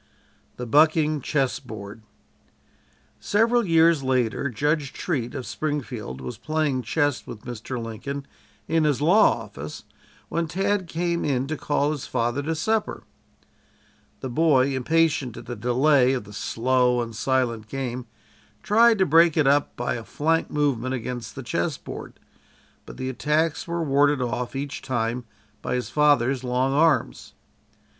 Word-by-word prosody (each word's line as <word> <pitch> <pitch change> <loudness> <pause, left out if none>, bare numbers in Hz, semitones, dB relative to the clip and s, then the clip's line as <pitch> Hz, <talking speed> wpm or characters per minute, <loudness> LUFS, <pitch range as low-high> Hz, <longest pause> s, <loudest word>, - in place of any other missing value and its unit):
THE 125 - -4
"BUCKING" 155 +3 +3
CHESS 135 -1 0
BOARD 110 -4 -9 1.2
Several 230 +3 +2
years 165 -4 +4
later 130 0 0
Judge 145 +3 -1
Treat, 130 -9 -3
of 130 -3 -5
Springfield 120 - -4
was 65 -1 -7
playing 155 -4 0
chess 145 +4 -1
with 105 - -9
Mr. 120 +1 -6
Lincoln 125 +5 -5 0.4
in 165 0 +2
his 150 -4 +2
law 165 - +4
office 75 -8 -9 0.4
when 170 0 -1
Tad 195 +2 0
came 170 +1 -1
in 135 -3 0
to 155 +3 -3
call 145 -1 0
his 150 -4 -5
father 120 +2 -1
to 160 +3 -2
supper. 220 +7 -1 1.2
The 130 - -4
boy, 135 -2 +3
impatient 145 -2 +1
at - - -9
the 120 - -5
delay 125 +3 +3
of 130 - -2
the 105 +1 -13
slow 125 +3 +1
and 115 -1 -4
silent 120 -2 0
game, 125 -1 -4 0.6
tried 230 +2 +5
to 190 - +3
break 165 0 +5
it 155 - +4
up 145 +1 +2
by 120 - -2
a 115 - -5
flank 165 +7 0
movement 130 -4 0
against 120 -1 -6
the 135 - -6
chess 85 -7 -1
board, - - -9 0.7
but - - -10
the 130 0 -3
attacks 150 +5 0
were 170 0 -2
warded 145 0 +3
off, 125 +1 -3
each 140 +1 -4
time, 120 -1 -2 0.4
by 125 - -2
his 125 - -3
father's 135 -3 +3
long 130 +2 0
arms. 150 -4 +1
135 Hz, 150 wpm, -24 LUFS, 120-155 Hz, 1.2 s, tried